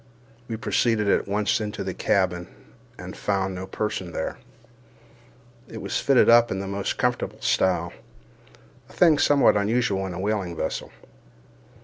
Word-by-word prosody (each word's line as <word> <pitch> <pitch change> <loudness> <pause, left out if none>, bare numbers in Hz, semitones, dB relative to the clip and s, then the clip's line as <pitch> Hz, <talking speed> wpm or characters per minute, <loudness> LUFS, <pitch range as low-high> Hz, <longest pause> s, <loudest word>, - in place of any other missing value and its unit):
We 115 - -4
proceeded 115 -1 +1
at 100 - +2
once 105 +3 0
into 105 -2 -4
the 95 -1 -4
cabin, 90 -3 0 0.5
and - - -8
found 95 -2 -1
no 95 +1 -6
person 95 -5 -4
there. 80 - -4 1.3
It - - -8
was - - -2
fitted 135 -3 +4
up 120 0 +6
in 95 - -2
the 100 - -4
most 100 0 -3
comfortable - - -1
style—a 95 -1 +1 1.0
thing 160 -5 +4
somewhat 145 -6 +4
unusual 100 -2 0
in 90 - -6
a - - -6
whaling 100 -3 -2
vessel. - - -4
100 Hz, 140 wpm, -24 LUFS, 95-110 Hz, 1.3 s, up